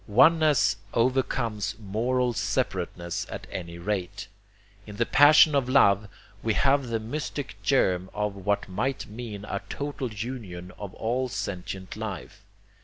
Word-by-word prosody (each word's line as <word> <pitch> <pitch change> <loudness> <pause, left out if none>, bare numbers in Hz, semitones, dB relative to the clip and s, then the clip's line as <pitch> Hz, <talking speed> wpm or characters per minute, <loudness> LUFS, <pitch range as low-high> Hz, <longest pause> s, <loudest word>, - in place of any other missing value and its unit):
Oneness 150 +1 +5 0.2
overcomes 115 -4 0
MORAL 120 +4 0
separateness 90 -8 -2
at - - -6
any 85 -2 -6
rate. 95 +2 -3 0.6
In 105 - -8
the 120 - +1
passion 150 +3 +7
of 135 -3 +1
love 105 -6 +4 0.3
we 110 -2 0
have 140 -1 +3
the 115 -1 -1
mystic 145 +5 -4
germ 95 -9 +2
of 105 -1 -2
what 100 +1 -1
might 120 +8 -2
mean 105 -2 -7
a - - -3
total 140 -4 -4
union 105 -5 -6
of 100 -2 -7
all 125 +3 -1
sentient 95 -3 -5
life. 105 -7 -6
110 Hz, 130 wpm, -27 LUFS, 100-130 Hz, 0.6 s, passion